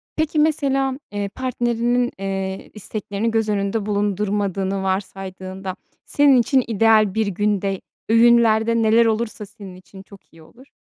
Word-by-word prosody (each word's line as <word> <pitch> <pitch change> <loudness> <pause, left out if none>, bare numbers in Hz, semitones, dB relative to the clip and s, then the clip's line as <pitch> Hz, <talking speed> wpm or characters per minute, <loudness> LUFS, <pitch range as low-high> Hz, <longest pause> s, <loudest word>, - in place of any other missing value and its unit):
Peki, 315 0 0
mesela, 275 -3 +1
eee, 205 -1 -3
partnerinin, 245 +1 -1
eee, 195 -1 -4
isteklerini 210 +1 -4
göz 225 -1 0
önünde 200 +1 -1
bulundurmadığını 200 -1 -1
varsaydığında, 190 0 -4 0.3
senin 285 -3 +4
için 260 +2 +2
ideal 220 -2 +3
bir 220 0 0
günde 200 0 -1 0.3
öğünlerde 230 -1 +4
neler 225 +1 +4
olursa 220 -1 -2
senin 200 -2 -12
için 190 +1 -14
çok 200 -4 -18
iyi 165 -1 -16
olur? 255 - -19
210 Hz, 125 wpm, -21 LUFS, 195-235 Hz, 0.3 s, senin